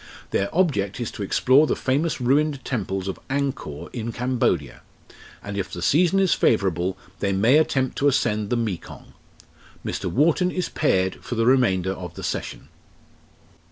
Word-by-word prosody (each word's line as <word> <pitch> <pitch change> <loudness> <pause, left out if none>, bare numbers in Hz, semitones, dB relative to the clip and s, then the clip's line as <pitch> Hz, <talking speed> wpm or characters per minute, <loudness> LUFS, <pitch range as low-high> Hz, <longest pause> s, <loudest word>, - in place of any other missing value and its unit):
Their 100 - 0
object 130 - 0
is 120 - -3
to - - -8
explore 130 +9 +4
the - - +1
famous 145 +5 0
ruined 140 +3 +1
temples 95 -6 -3
of 95 - -4
Angkor 135 - -3
in 115 -1 -4
Cambodia, 115 - -1 0.6
and 100 0 -6
if 100 -2 -3
the 85 - -5
season 180 +5 +3
is 190 -2 +3
favourable 95 -4 +1 0.2
they 100 - 0
may 110 +10 +4
attempt 135 -4 0
to 145 - +3
ascend 105 -6 +1
the 120 - +1
Mekong. 110 -7 -5 0.7
Mr. - - -3
Wharton 165 +6 +2
is 180 0 -2
paired 95 -11 +1
for 120 - -4
the 115 0 +1
remainder 95 -8 +3
of 90 -2 -8
the - - -8
session." - - -4
120 Hz, 155 wpm, -23 LUFS, 95-140 Hz, 0.7 s, explore